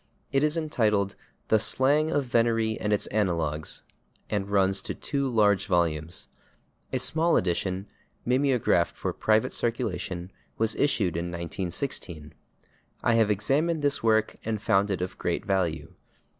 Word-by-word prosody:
It 135 +1 +2
is 150 +2 +2
entitled 105 -11 +1 0.4
"The 110 - +5
Slang 145 +7 +2
of 145 -3 +1
Venery 115 -2 +1
and 105 - -1
Its 105 - +2
Analogues," 85 -7 -1 0.5
and 100 -2 -1
runs 95 -1 +2
to - - -4
two 140 -2 -2
large 105 -4 +3
volumes. 85 -3 0 0.6
A - - 0
small 165 +2 +2
edition, 95 +2 -1 0.4
mimeographed 125 -9 +2
for - - -3
private 110 0 +1
circulation, 100 -6 -2 0.3
was 110 0 +2
issued 105 - +1
in 85 +1 -2
1916. 85 - -4 0.7
I 120 - +3
have 110 -2 +3
examined 145 - +1
this 145 0 +1
work 110 -1 +2
and 110 -1 -2
found 100 -2 +2
it 95 -3 -1
of 90 - -6
great 85 - -2
value. 95 -5 -1
105 Hz, 140 wpm, -27 LUFS, 90-125 Hz, 0.7 s, The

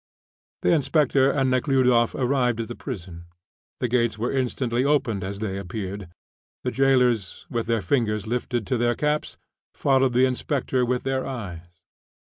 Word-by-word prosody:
The - - +3
inspector 140 -2 +3
and 135 -2 +1
Nekhludoff 130 -3 +3
arrived 125 -3 +1
at 115 - -3
the 120 - -6
prison. 90 - -7 0.5
The 125 - 0
gates 120 -2 +1
were 115 +3 -1
instantly 125 -2 0
opened 135 -9 +1
as 100 +1 -4
they 100 -2 -3
appeared. 100 0 -6 0.5
The - - -1
jailers, 125 -6 +2
with 115 -2 -2
their 115 -3 0
fingers 105 -1 0
lifted 120 0 -2
to 125 +2 -1
their 120 0 +2
caps, 150 0 -1 0.4
followed 135 -2 +2
the 125 +2 +5
inspector 130 0 -1
with 125 0 0
their 135 0 -1
eyes. 100 -10 -6
125 Hz, 150 wpm, -24 LUFS, 110-135 Hz, 0.5 s, the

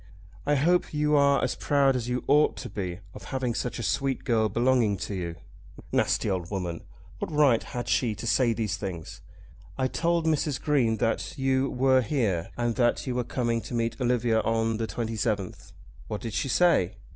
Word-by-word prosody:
"I 145 - +3
hope 165 +3 +2
you 150 0 +2
are 140 -1 +4
as 130 - 0
proud 140 -2 +2
as 120 -1 -2
you 125 0 -1
ought 150 +2 +3
to - - -6
be 95 -2 -4
of - - -10
having 130 -3 -2
such 125 - -3
a 115 - -4
sweet 135 +5 -1
girl 110 -3 +2
belonging 120 -4 +2
to 100 - -5
you." 85 -3 -4 0.6
Nasty - - +1
old 90 -4 -2
woman! 90 -4 -3 0.4
What - - -4
right 145 -6 +4
had 120 -1 -6
she 115 -4 +1
to 120 - -7
say 120 +2 +3
these 110 -3 -2
things? 90 -5 -6 0.6
"I 130 - +1
told 170 +4 0
Mrs. 150 -3 0
Green 125 -7 +1
that 115 - -1
you 135 0 +1
were 130 0 +3
here, 110 - -1
and 120 -1 0
that 120 -2 +2
you 130 - -2
were 125 0 0
coming 115 -1 -1
to 120 - -6
meet 115 0 -2
Olivia 120 -2 +2
on 115 0 0
the 115 0 -2
27th." 110 -4 -3 0.4
"What 105 - -4
did 115 -3 -5
she - - -1
say?" 125 - +3
120 Hz, 190 wpm, -27 LUFS, 110-135 Hz, 0.6 s, are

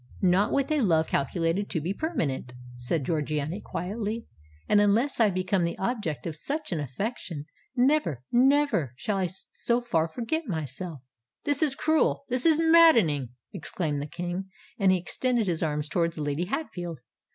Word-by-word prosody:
"Not 185 +3 +4
with 275 +2 +1
a 305 -2 +2
love 165 -7 +3
calculated 165 +8 0
to 165 - -1
be 170 +6 -2
permanent," 160 - -2 0.2
said 125 +5 -2
Georgiana 155 +3 -1
quietly; 210 +5 -4 0.4
"and 205 -1 +5
unless 225 +8 +2
I 220 -2 +5
become 185 0 0
the 170 - -2
object 195 - -2
of 165 -3 -3
such 290 - -3
an 170 - -1
affection, 150 - -4 0.3
never—never 250 - +2
shall 200 +9 -2
I 190 -1 +1
so 235 +6 -2
far 170 -10 0
forget 250 - -3
myself——" 160 - -5 0.4
"This 290 0 +1
is 295 -4 +3
cruel—this 280 -4 +1
is 315 -2 +5
maddening!" 315 - +5 0.2
exclaimed 155 -2 -3
the 145 - -4
King; 180 +4 -4 0.3
and 195 -2 +5
he 185 - +4
extended 235 +6 0
his 170 -4 -1
arms 150 -2 0
towards 170 0 0
Lady 145 +3 -1
Hatfield. 175 - -4
185 Hz, 150 wpm, -27 LUFS, 160-245 Hz, 0.4 s, and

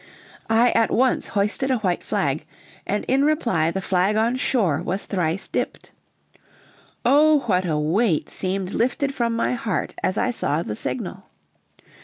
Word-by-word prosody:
I 230 +2 +4
at 230 -1 +2
once 255 +1 +1
hoisted 210 +6 -1
a 260 - +2
white 185 -5 -1
flag, - - -1 0.4
and 205 - -1
in 270 +2 +3
reply 245 - +1
the 195 +3 -3
flag 190 +2 +1
on 225 +3 +2
shore 200 - +1
was 190 +3 -3
thrice 180 -1 -1
dipped. - - -4 1.1
Oh, 300 +1 +5
what 185 -6 0
a 155 -3 0
weight 165 +4 +1
seemed 190 0 -3
lifted 265 +4 0
from 235 -3 -1
my 230 - 0
heart 230 -3 -2
as 185 - -1
I 250 - +1
saw 160 -8 -1
the 105 - -4
signal! - - -5
210 Hz, 155 wpm, -23 LUFS, 180-250 Hz, 1.1 s, Oh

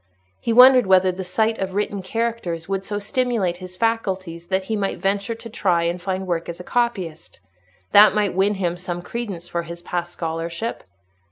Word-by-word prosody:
He - - -2
wondered 250 -1 +8
whether 185 0 +5
the 185 +1 -6
sight 220 +5 0
of 190 -1 -3
written 205 -1 -1
characters 190 -5 -3
would 195 0 -2
so 205 +1 -3
stimulate 210 -4 0
his 185 0 -9
faculties 190 -7 -1
that 190 +1 0
he 220 +3 -2
might 200 -2 -1
venture 200 +3 -1
to 230 - -10
try 180 -6 +1
and 170 +1 -1
find 190 +1 -2
work 170 -2 -2
as 170 - -6
a - - -7
copyist: 190 -9 -2 0.5
that 210 +1 +8
might 205 -3 +1
win 195 +3 +2
him 175 -2 -1
some 175 -1 -5
credence 195 -6 -5
for 170 - -2
his 170 +1 -9
past 175 -1 -3
scholarship. 165 +6 -4
190 Hz, 185 wpm, -22 LUFS, 175-215 Hz, 0.5 s, wondered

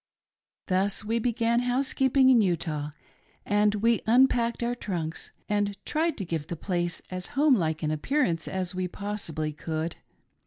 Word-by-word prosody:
Thus 195 +3 0
we 225 +2 0
began 235 0 +1
housekeeping 260 +1 +3
in 240 -3 +6
Utah, 160 -6 -1 0.6
and 205 +1 +3
we 230 +2 +2
unpacked 235 -1 +3
our 240 +1 0
trunks 170 -9 -4 0.2
and 205 -1 0
tried 320 +2 0
to 195 - -4
give 165 -3 -3
the 170 - -4
place 175 0 -2
as 185 -1 -4
home 295 0 +5
like 160 -7 0
an 155 - 0
Appear 275 - +1
ance 165 -7 -1
as 185 -1 -3
we 185 0 -2
possibly 170 -6 -4
could. 160 +2 -4
205 Hz, 155 wpm, -27 LUFS, 170-235 Hz, 0.6 s, in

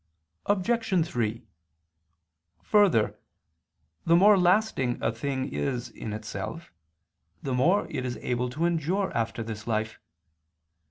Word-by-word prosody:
Obj. 205 -3 +1
3: 115 -3 -2 1.2
Further, 195 - +3 0.8
the 165 - +4
more 205 +4 +7
lasting 180 - +2
a 115 - 0
thing 130 +3 -3
is 125 -4 -2
in 110 - -7
itself, 110 - -6 0.7
the 135 - -2
more 170 +11 +3
is 125 -1 -4
it - - -12
able 125 0 0
to 155 +7 -1
endure 175 +4 0
after 115 0 -1
this 110 0 -7
life. 110 -1 -2
135 Hz, 115 wpm, -27 LUFS, 115-185 Hz, 1.2 s, more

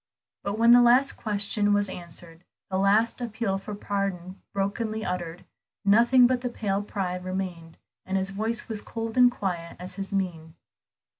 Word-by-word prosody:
But 200 +1 -3
when 230 +1 +6
the 245 0 +8
last 250 +3 +5
question 205 -1 0
was 205 0 +2
answered, 170 -2 -10 0.3
the 190 - 0
last 215 +5 +2
appeal 220 -4 -2
for 205 +1 -7
pardon 195 -3 -3
brokenly 215 +2 -2
uttered, 175 -2 -4 0.4
nothing 235 +5 +6
but 250 0 +2
the 250 - -2
pale 200 -4 -1
pride 180 -3 -3
remained; 180 -3 -5 0.3
and 190 +1 -2
his 190 0 -2
voice 220 +4 -3
was 220 -2 -4
cold 225 -1 -5
and 250 -1 +7
quiet 175 -7 -4
as 180 +2 -8
his 195 - -5
mien. 175 -5 -3
200 Hz, 160 wpm, -26 LUFS, 185-225 Hz, 0.4 s, the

